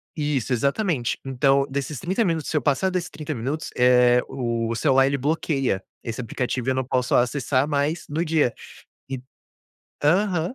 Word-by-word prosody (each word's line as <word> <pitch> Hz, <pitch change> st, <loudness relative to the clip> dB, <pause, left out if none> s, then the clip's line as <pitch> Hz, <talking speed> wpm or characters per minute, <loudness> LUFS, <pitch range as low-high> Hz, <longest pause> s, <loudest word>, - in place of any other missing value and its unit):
Isso, 145 Hz, -5 st, -1 dB
exatamente. 140 Hz, -, 0 dB
Então, 135 Hz, +1 st, +2 dB
desses 140 Hz, 0 st, -3 dB
30 190 Hz, +6 st, 0 dB
minutos, 165 Hz, -4 st, -1 dB
se 155 Hz, -, 0 dB
eu -, -, +1 dB
passar 145 Hz, +8 st, +1 dB
desses 180 Hz, -2 st, -2 dB
30 155 Hz, 0 st, -5 dB
minutos, 135 Hz, +7 st, -3 dB
eh, 125 Hz, 0 st, +5 dB
o 120 Hz, -3 st, -2 dB
o 115 Hz, -, -1 dB
celular, 135 Hz, 0 st, +4 dB
ele 140 Hz, -, 0 dB
bloqueia 135 Hz, -, 0 dB, 0.2 s
esse 115 Hz, 0 st, -5 dB
aplicativo 125 Hz, +1 st, -3 dB
e 130 Hz, -, +3 dB
eu -, -, 0 dB
não 130 Hz, -, 0 dB
posso 125 Hz, 0 st, 0 dB
acessar 130 Hz, +2 st, +1 dB
mais 150 Hz, +3 st, -1 dB
no 160 Hz, +3 st, -1 dB
dia 155 Hz, -7 st, +2 dB, 0.6 s
e 130 Hz, -2 st, -4 dB, 0.8 s
aham. 180 Hz, -, +2 dB
140 Hz, 170 wpm, -24 LUFS, 125-155 Hz, 0.8 s, eh